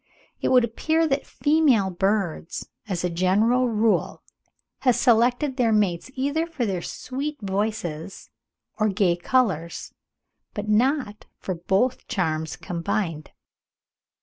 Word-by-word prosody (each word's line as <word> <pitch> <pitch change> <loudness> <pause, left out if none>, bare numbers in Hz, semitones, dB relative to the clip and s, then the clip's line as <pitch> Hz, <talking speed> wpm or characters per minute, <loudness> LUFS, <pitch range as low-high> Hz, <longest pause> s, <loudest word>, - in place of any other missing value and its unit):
It - - 0
would 250 -1 +5
appear 315 +8 +1
that 275 -1 -1
female 290 -11 +2
birds, 190 -3 -1 0.2
as 180 -4 -2
a 180 - +1
general 215 +8 +2
rule, 220 0 +1 0.6
have 250 -3 +3
selected 245 +4 +2
their 235 -3 +3
mates 205 -2 +1
either 285 +5 0
for 305 -8 -2
their 190 -4 -2
sweet 280 - -5
voices 195 -4 -3 0.5
or 215 0 +3
gay 195 -3 +2
colours, 175 -4 -1 0.6
but 205 -1 -4
not 225 0 +1
for 185 - -4
both 195 +9 0
charms 160 -4 -1
combined. 170 -2 -3
215 Hz, 120 wpm, -24 LUFS, 180-255 Hz, 0.6 s, would